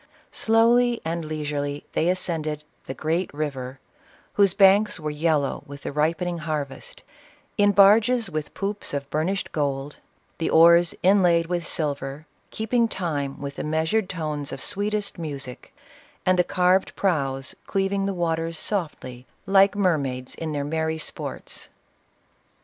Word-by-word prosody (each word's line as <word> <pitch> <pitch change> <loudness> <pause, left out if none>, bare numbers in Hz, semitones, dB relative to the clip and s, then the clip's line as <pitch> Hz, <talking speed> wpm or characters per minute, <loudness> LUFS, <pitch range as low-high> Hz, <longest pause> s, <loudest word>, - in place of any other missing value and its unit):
Slowly 235 +2 +3
and 165 +1 -2
leisurely 145 -2 -3
they 165 - +1
ascended 160 -5 -2
" - - -39
the 135 - -5
great 165 +4 -1
river," 135 -3 -4 0.5
whose 200 -3 +3
banks 200 +1 +5
were 155 -1 -3
yellow 150 -2 0
with 140 0 -10
the - - -4
ripening 165 +4 0
har 155 -2 -2
vest, 135 - -11 0.5
in 205 -1 +4
barges 215 +4 +5
with 155 -4 -5
poops 200 -6 -3
of 140 -1 -3
burnished 170 +6 -1
gold 140 -1 -2 0.2
— - - -40
the 165 - 0
oars, 170 +1 +6
inlaid 180 -3 +4
with 175 0 -2
silver, 140 -1 -3 0.2
keeping 230 +2 +1
time 145 -9 -3
with 140 0 -6
the - - -3
measured 160 +7 0
tones 150 -5 -4
of - - -6
sweetest 205 -1 -2
music, 140 -6 -6 0.5
and 185 -1 +3
the - - +6
carved 185 +2 +2
prows 135 -8 -1
cleav 195 0 0
ing 195 0 0
the 195 - -2
waters 165 -1 -1
softly, 140 - -3 0.2
like 195 +1 +5
mermaids 140 -10 0
in 160 -1 -5
their 145 -1 -2
merry 160 +1 -1
sports. 155 - -6
165 Hz, 145 wpm, -24 LUFS, 145-195 Hz, 0.5 s, oars